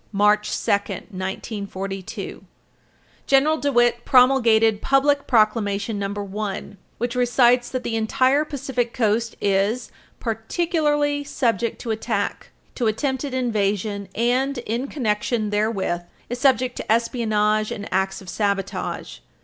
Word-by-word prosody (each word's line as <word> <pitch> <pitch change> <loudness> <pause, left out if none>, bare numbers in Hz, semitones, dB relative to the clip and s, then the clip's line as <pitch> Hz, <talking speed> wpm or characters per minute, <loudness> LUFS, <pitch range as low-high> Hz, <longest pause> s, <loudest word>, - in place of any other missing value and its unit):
March 210 +1 +3 0.2
2, - - +2 0.4
192, 195 0 -5 0.8
General 285 +3 +4
DeWitt 240 -5 +2
promulgated 230 -5 +4
Public 280 +1 +2
Proclamation 215 -2 +1
No. 200 - -1
1, 200 - -5
[Footnote 200 0 -4
2/2] 200 - -17 0.2
which 240 +1 -2
recites 245 0 +3
that 255 -1 -3
the 225 - -2
entire 260 +6 +2
Pacific 265 -5 -3
Coast 230 -1 +1
is 200 +5 0 0.3
"particularly 295 - 0
subject 235 -5 -1
to 230 - -3
attack, 220 - -2 0.2
to 240 - -1
attempted 265 +4 -1
invasion..., 205 -4 -1
and, 255 +4 +1
in 235 +5 -2
connection 215 -4 -1
therewith, 205 -4 0 0.3
is 245 +1 -4
subject 255 -1 +2
to - - -3
espionage 215 -2 +1
and 205 - -5
acts 190 +1 0
of - - -15
sabotage." 200 0 -2
230 Hz, 120 wpm, -23 LUFS, 205-255 Hz, 0.8 s, General